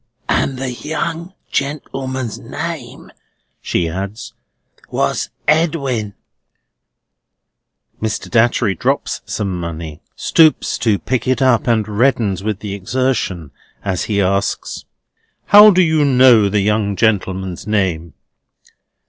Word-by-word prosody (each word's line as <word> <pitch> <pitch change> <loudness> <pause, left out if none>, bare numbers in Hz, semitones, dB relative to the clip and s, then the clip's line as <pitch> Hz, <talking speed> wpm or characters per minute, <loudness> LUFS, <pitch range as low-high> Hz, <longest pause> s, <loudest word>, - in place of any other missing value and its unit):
"And 135 - 0
the 130 0 -3
young 165 +6 -4 0.2
gentleman's 135 -4 -3
name," - - -7 0.5
she 85 - -1
adds, 100 +6 -6 0.6
"was - - -1 0.2
Edwin." 140 - 0 1.9
Mr. 110 -1 -3
Datchery 120 -3 +2
drops 85 - -1
some 95 -3 -3
money, 80 -2 -6
stoops 160 -2 +3
to 110 -4 +2
pick 125 +3 -2
it 130 -2 +1
up, 130 -3 +2
and 110 -3 +2
reddens 110 -3 +1
with 105 -2 -3
the 105 -2 -5
exertion 100 - -2 0.3
as 95 -3 -1
he 105 -2 -1
asks: 100 +1 -1 0.6
"How 210 +1 +9
do 185 -2 +4
you 160 -2 +2
know 125 -6 +5
the 105 +1 +1
young 105 0 0
gentleman's 95 -4 -1
name?" 90 -7 -1
110 Hz, 110 wpm, -17 LUFS, 100-130 Hz, 1.9 s, How